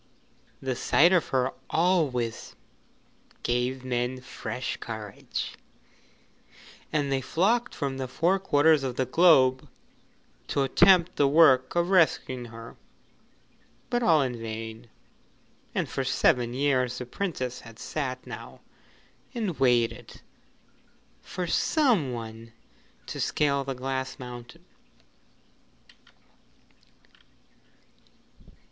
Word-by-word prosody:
The 130 -1 -1
sight 170 +8 +4
of 180 - +3
her 130 0 0 0.2
always 155 -10 0 0.9
gave 125 +2 -1
men 125 0 -1
fresh 130 0 -5
courage, 110 -3 -6 1.4
and 145 -2 0
they 135 -1 +1
flocked 220 - +1
from 135 -2 -3
the 130 - -3
four 175 +9 +1
quarters 155 -4 +4
of 130 -2 -3
the 130 - 0
globe 130 -6 +4 0.8
to 140 - 0
attempt 175 +5 +4
the 145 - +4
work 135 -3 +5
of 175 +1 +1
rescuing 140 -8 +2
her. 115 0 -11 1.1
But 240 - +1
all 160 - +4
in 125 -3 -4
vain, 115 +1 -7 0.9
and - - 0
for - - -3
seven 120 -1 +2
years 130 -3 +1
the 125 - -5
Princess 130 -4 -4
had 115 -1 -13
sat 130 -4 -4
now - - -9 0.7
and 210 -10 -3
waited 120 -3 +1 1.0
for 180 - -5
some 210 - +2
one 115 -1 -8 0.5
to - - -6
scale 140 -2 +1
the 135 0 -4
Glass 130 +1 -4
Mountain. 120 -1 -10
130 Hz, 100 wpm, -27 LUFS, 125-160 Hz, 1.4 s, work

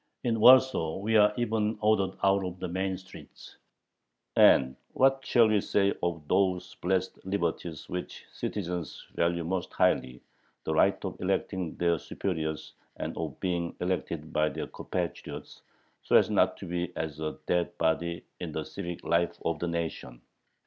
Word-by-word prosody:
In 115 -3 0
Warsaw 125 -9 +6
we 110 +3 0
are 105 -1 +6
even 110 -2 0
ordered 105 -3 +2
out 100 0 +4
of 90 0 -5
the 90 - -4
main 95 +1 -2
streets. 95 +1 -14 0.8
And 65 0 +6 0.2
what 135 0 +3
shall 120 -3 +5
we 105 -2 +3
say 100 0 +2
of 80 -4 -2
those 95 0 +1
blessed 95 +1 -1
liberties 85 -4 -3
which 90 0 -6
citizens 90 -4 -4
value 85 0 +1
most 90 0 -2
highly 65 -1 +1 0.4
the - - -1
right - - +4
of - - -6
electing 95 -2 -1
their 85 -2 +1
superiors 80 -4 -4 0.2
and - - -4
of - - -5
being 85 -2 -2
elected 85 -3 -3
by 75 0 +2
their - - -4
compatriots, - - -5 0.4
so - - +1
as - - +5
not - - +3
to - - -8
be 90 0 -3
as 80 -2 -4
a 80 0 -3
dead 85 0 0
body 85 +1 0 0.2
in - - -5
the - - -2
civic 85 0 -6
life 85 0 +1
of 85 -2 0
the 85 - -2
nation? 80 -7 -4
90 Hz, 155 wpm, -29 LUFS, 85-100 Hz, 0.8 s, Warsaw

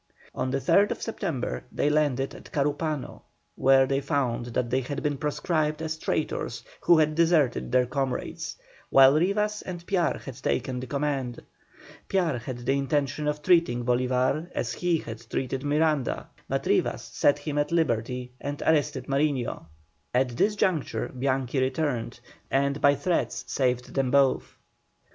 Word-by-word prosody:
On 130 - -2
the 135 - 0
3rd 180 +8 +3
September 60 - -3
they - - 0
landed 145 -3 +1
at - - -12
Carúpano, 145 -1 -2 0.3
where 135 0 +5
they 135 +1 0
found 130 -4 -1
that 120 0 -2
they 130 +1 +2
had 140 +3 -5
been 145 -1 0
proscribed 150 +1 -1
as 160 0 -3
traitors 160 - -2 0.2
who 170 - +5
had 155 -1 +3
deserted 160 -8 +2
their 125 0 +4
comrades, 135 0 -3 0.3
while 135 0 +7
Rivas 210 +6 +1
and 175 -2 -7
Piar 180 -3 +1
had 135 0 -9
taken 130 -1 -1
the 130 - -6
command. 140 -3 -2 0.7
Piar 170 -10 +1
had 120 +1 -7
the 135 +2 +2
intention 140 +1 0
of 150 0 -2
treating 165 -10 +3
Bolívar 130 +6 +1
as 115 -1 -1
he 175 -2 +1
had 115 -7 -7
treated 135 +1 -2
Miranda, 150 -2 +1 0.2
but - - -1
Rivas - - +1
set 145 - +2
him 150 -2 -3
at 145 +1 0
liberty 125 -5 0
and 145 +1 -4
arrested 145 -4 +1
Mariño. 135 - -1 0.5
At 130 0 +3
this 200 - +1
juncture 180 -8 0
Bianchi 130 0 -1
returned, 130 -3 -1 0.3
and 140 +1 +1
by 140 0 +5
threats 170 +5 -1
saved 125 -2 -1
them 135 -2 +1
both. 140 0 +2
140 Hz, 150 wpm, -27 LUFS, 130-155 Hz, 0.7 s, while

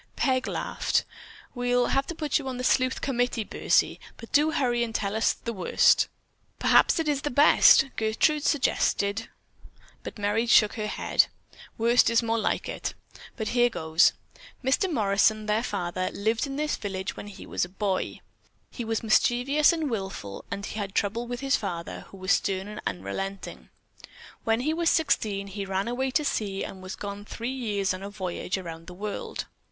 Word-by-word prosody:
Peg 260 -2 +1
laughed. - - -1 0.5
"We'll 245 0 +1
have 275 0 +1
to 340 - -5
put 305 -1 0
you 275 - -7
on 255 -1 -4
the 250 - -4
sleuth 255 0 +2
committee, 245 -4 0
Bursie, - - +1 0.2
but 230 - -12
do 300 +2 +4
hurry 245 -6 +1
and 225 -1 -5
tell 200 0 -1
us 220 - +3
the 235 - -6
worst." 190 - +3 0.5
"Perhaps - - +4
it's 300 -4 0
the 295 - -2
best," 285 0 +6
Gertrude 230 +7 +1
suggested, 225 -7 +1 0.7
but - - -8
Merry 210 +3 0
shook 215 -2 +5
her 215 -2 -3
head. - - +2 0.5
"Worst 235 +1 +4
is 230 +1 +3
more 230 0 0
like - - -1
it. - - -4 0.4
But 220 -3 -2
here 245 0 +3
goes: 160 -5 +3 0.5
Mr. 280 +9 +1
Morrison, 215 -2 +2
their 210 +1 +1
father, 185 -5 -2
lived 220 +6 0
in 275 - -5
this 300 +1 -1
village 190 -2 -4
when - - -8
he 205 - -10
was - - -1
a 175 - -3
boy. 195 0 -2 0.5
He 240 - -5
was 225 0 -2
mischievous 245 +6 +3
and 320 -3 -1
wilful 190 - -5
and 200 +1 -4
he 220 - -5
had 195 -2 -5
trouble 230 +4 0
with 245 +1 -5
his 275 0 +2
father, 175 -5 -5
who 195 - -12
was 185 0 -1
stern 195 -1 +1
and 210 0 -7
unrelenting. 100 - -5 0.8
When 225 +1 +2
he 305 +5 0
was 335 0 +2
sixteen 210 -11 +1
he 200 0 -5
ran 195 +1 -2
away 260 +2 -1
to 295 +3 0
sea 200 -7 -1
and 190 - -7
was 185 0 -6
gone 205 0 -6
three 235 +4 -5
years 205 -7 -1
on 185 - -7
a 200 - -6
voyage 190 -2 -3
around 165 -3 -8
the 180 - -9
world. 205 +2 -5
220 Hz, 180 wpm, -27 LUFS, 195-255 Hz, 0.8 s, best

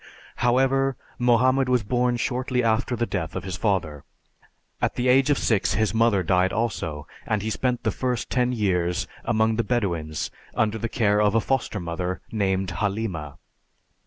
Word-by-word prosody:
However, 135 +2 +2 0.2
Mohammed 125 +2 +3
was 125 -3 +2
born 125 +3 +1
shortly 125 +1 -1
after 115 +2 +1
the 120 0 0
death 85 -7 -4
of - - -3
his 95 -2 -4
father. 90 -9 -1 0.8
At - - 0
the 125 - 0
age 130 +2 +4
of 145 - +3
six 105 -4 +1
his 110 -1 +1
mother 110 -4 +3
died 90 +2 +2
also, 85 -10 -2 0.2
and 105 -2 0
he 110 - -2
spent 125 +1 -1
the 110 - +1
first 125 +3 -2
ten 125 -1 +2
years 90 -6 0 0.2
among 110 -1 +2
the 115 - +2
Bedouins 85 - -2 0.2
under 110 0 +1
the 115 - -3
care 105 -2 +2
of 105 +1 +2
a - - +5
foster 125 -3 -1
mother 90 +1 -3
named 95 -3 0
Halima. 95 -6 -3
110 Hz, 165 wpm, -24 LUFS, 95-125 Hz, 0.8 s, a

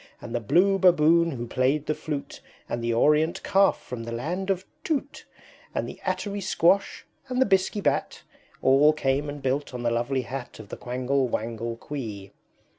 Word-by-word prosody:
And 115 - -8
the 120 - 0
Blue 190 - +3
Baboon 170 -2 +5
who 120 -6 -4
played 130 +5 0
the 155 - 0
flute, 150 -2 -6 0.3
And 120 - -3
the 115 - 0
Orient 150 +9 +2
Calf 195 0 +3
from 125 -2 -7
the 115 - -6
Land 170 +11 -3
of 190 -1 0 0.2
Tute, 290 -2 -3 0.5
And - - -1
the - - -9
Attery 190 +2 -2
Squash, 190 +1 +2 0.2
and 255 -1 -2
the 260 - +5
Bisky 195 0 +1
Bat, - - -1 0.4
All 140 +3 +6
came 140 0 0
and 145 -1 -7
built 135 0 -1
on 120 - -5
the 120 - +1
lovely 125 +3 0
Hat 130 +1 -7
Of 110 -2 -11
the - - -7
Quangle 130 +2 -1
Wangle 115 0 -3
Quee. 110 -9 -6
145 Hz, 180 wpm, -26 LUFS, 120-180 Hz, 0.5 s, All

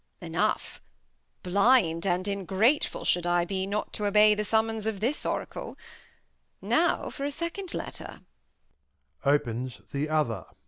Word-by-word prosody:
Enough! - - -2 0.6
Blind 195 -3 +3
and 180 0 +1
Ingratef 200 - +1
ull - - -6
should 175 0 +2
I 175 0 +2
be 190 +1 -2
Not 205 +2 -3
to 210 - 0
obey 210 +1 +6
the 210 0 -1
Summons 220 0 0
of 215 -3 -2
this 250 +8 -1
Oracle. - - -4 0.8
Now - - +1
for 275 - -6
a 285 - 0
Second 335 +5 -4
Letter. - - -6 1.0
[Opens 130 -3 0
the 145 +2 -2
other. 135 - 0
200 Hz, 135 wpm, -28 LUFS, 170-220 Hz, 1.0 s, obey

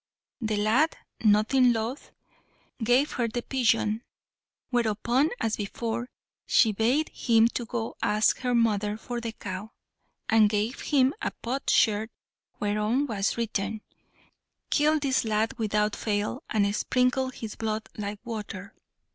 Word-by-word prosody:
The 215 -2 -1
lad, 225 +10 +2 0.3
nothing 225 +4 +4
loth, 230 +5 -4 0.7
gave 245 +6 +3
her 240 -2 0
the 235 +2 -3
pigeon; 225 -4 +1 0.7
whereupon, 240 +4 +2
as 225 - -1
before, 230 +3 -3 0.4
she 225 - +5
bade 240 +9 +1
him 225 -2 +3 0.2
go 230 -1 -3
ask 210 +1 +2
her 250 -1 0
mother 210 -2 +1
for 240 +1 -5
the 230 -1 -3
cow, 205 +1 -7 0.5
and 220 -1 +5
gave 215 +4 -1
him 270 -3 +3
a - - 0
potsherd 225 -4 +2 0.5
whereon 210 +6 +1
was 210 -5 -1
written 215 -2 -2 0.9
"Kill 305 +1 +3
this 275 -3 +1
lad 220 0 0
without 210 -1 +1
fail, 210 +4 -2
and 200 -1 +1
sprinkle 255 +3 +1
his 225 -4 -7
blood 215 -1 -3
like 205 0 -4
water!" 205 -4 -6
225 Hz, 125 wpm, -27 LUFS, 210-245 Hz, 0.9 s, she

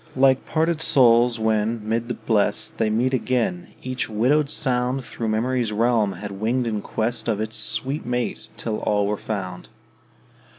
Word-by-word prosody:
Like 130 0 +3
parted 160 0 0
souls, 120 -5 +4
when, 110 0 0
mid 115 +1 -1
the 120 - -3
Blest 105 -2 0
They 110 - +2
meet 120 +5 +1
again, 120 -8 -1 0.2
each 130 0 -2
widowed 135 +7 +2
sound 130 -3 0
Thro' 115 - -4
memory's 115 +1 0
realm 110 -2 +2
had 100 +3 -7
winged 120 +3 +1
in 110 -3 -2
quest 110 +1 -2
Of 110 -3 0
its 110 +1 -3
sweet 130 +7 -1
mate, 120 -2 -3
till 110 -2 -3
all 105 -1 +1
were 105 +1 0
found. 95 -4 -5
115 Hz, 160 wpm, -23 LUFS, 110-125 Hz, 0.2 s, souls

